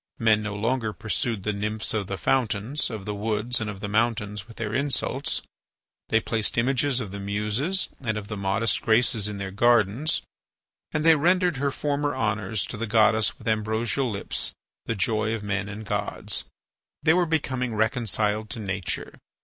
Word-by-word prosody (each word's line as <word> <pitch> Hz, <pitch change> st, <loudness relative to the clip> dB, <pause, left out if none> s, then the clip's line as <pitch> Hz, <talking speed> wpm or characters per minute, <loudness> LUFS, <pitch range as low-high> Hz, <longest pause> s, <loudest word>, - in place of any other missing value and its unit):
Men 110 Hz, -2 st, +4 dB
no 105 Hz, -1 st, -4 dB
longer 110 Hz, +1 st, 0 dB
pursued 105 Hz, -1 st, -2 dB
the 105 Hz, -, 0 dB
nymphs 105 Hz, +2 st, -1 dB
of 105 Hz, -3 st, -1 dB
the 100 Hz, -, -3 dB
fountains, 120 Hz, -, +1 dB
of 105 Hz, -4 st, -6 dB
the 105 Hz, -, -2 dB
woods, 110 Hz, +3 st, 0 dB
and 110 Hz, -, -2 dB
of 100 Hz, -2 st, -7 dB
the 105 Hz, -, -3 dB
mountains 105 Hz, -1 st, 0 dB
with 115 Hz, -, -14 dB
their 110 Hz, -2 st, -3 dB
insults. 140 Hz, +2 st, 0 dB, 0.7 s
They 110 Hz, -, +4 dB
placed 110 Hz, 0 st, -1 dB
images 130 Hz, +2 st, +2 dB
of 105 Hz, -6 st, -5 dB
the 100 Hz, -, -6 dB
Muses 105 Hz, -, 0 dB
and 110 Hz, -5 st, -2 dB
of 105 Hz, -1 st, -5 dB
the 105 Hz, -, -4 dB
modest 100 Hz, +3 st, +1 dB
Graces 110 Hz, -2 st, +3 dB
in 105 Hz, -1 st, -4 dB
their 100 Hz, -1 st, -4 dB
gardens, 120 Hz, +6 st, +3 dB, 0.7 s
and 150 Hz, +1 st, -1 dB
they 165 Hz, -, +9 dB
rendered 175 Hz, +1 st, +3 dB
her 140 Hz, +1 st, +1 dB
former 145 Hz, 0 st, -1 dB
honours 105 Hz, -5 st, 0 dB
to 110 Hz, -, -6 dB
the 115 Hz, +1 st, -2 dB
Goddess 110 Hz, 0 st, +3 dB
with 115 Hz, -, -11 dB
ambrosial 110 Hz, +4 st, +1 dB
lips, 100 Hz, -3 st, -2 dB, 0.3 s
the 115 Hz, -, 0 dB
joy 110 Hz, +2 st, +1 dB
of 110 Hz, -, -6 dB
men 100 Hz, 0 st, -2 dB
and 105 Hz, +2 st, -7 dB
gods. 105 Hz, -1 st, -1 dB, 0.6 s
They 160 Hz, -, +5 dB
were 175 Hz, -1 st, +3 dB
becoming 130 Hz, -7 st, -1 dB
reconciled 110 Hz, -2 st, +1 dB
to -, -, -3 dB
nature. 100 Hz, -3 st, -3 dB
110 Hz, 175 wpm, -26 LUFS, 105-125 Hz, 0.7 s, they